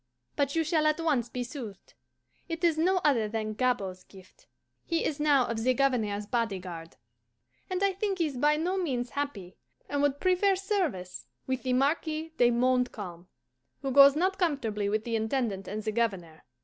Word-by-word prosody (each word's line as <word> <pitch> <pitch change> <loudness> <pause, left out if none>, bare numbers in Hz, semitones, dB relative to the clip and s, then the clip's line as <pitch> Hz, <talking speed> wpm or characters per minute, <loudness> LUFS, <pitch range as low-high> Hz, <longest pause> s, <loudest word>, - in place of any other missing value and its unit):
But 280 0 0
you 325 - +2
shall 315 -1 +2
at 305 +1 +1
once 285 -8 0
be 250 +1 -3
soothed. 235 -6 -9 0.6
It 330 +1 -4
is 335 -2 +4
no 360 +4 +2
other 240 -7 +3
than 215 -1 -3
Gabord's 200 -6 -1
gift. 190 -2 -18 0.4
He 335 -1 -1
is 300 - -2
now 290 -4 +4
of 230 -1 -3
the 255 +1 +3
Governor's 225 -6 0
body 225 -2 -1
guard, 170 -3 -9 0.7
and 370 +1 -1
I 395 -1 +3
think 390 0 -2
is 310 -5 0
by 295 +4 +3
no 360 +5 -1
means 255 -8 -2
happy, 270 -11 -5 0.3
and 285 0 -1
would 285 -1 +1
prefer 370 +1 +3
service 360 - -2 0.2
with 260 -1 -2
the 255 -1 -1
Marquis 310 +4 0
de 240 - +5
Montcalm, 235 -8 -1 0.6
who 270 - -1
goes 280 +1 +8
not 375 +5 0
comfortably 225 - 0
with 215 +1 0
the 230 0 -2
Intendant 220 -4 -1
and 210 +2 -4
the 215 - -1
Governor. 195 -8 -2
255 Hz, 175 wpm, -29 LUFS, 215-315 Hz, 0.7 s, goes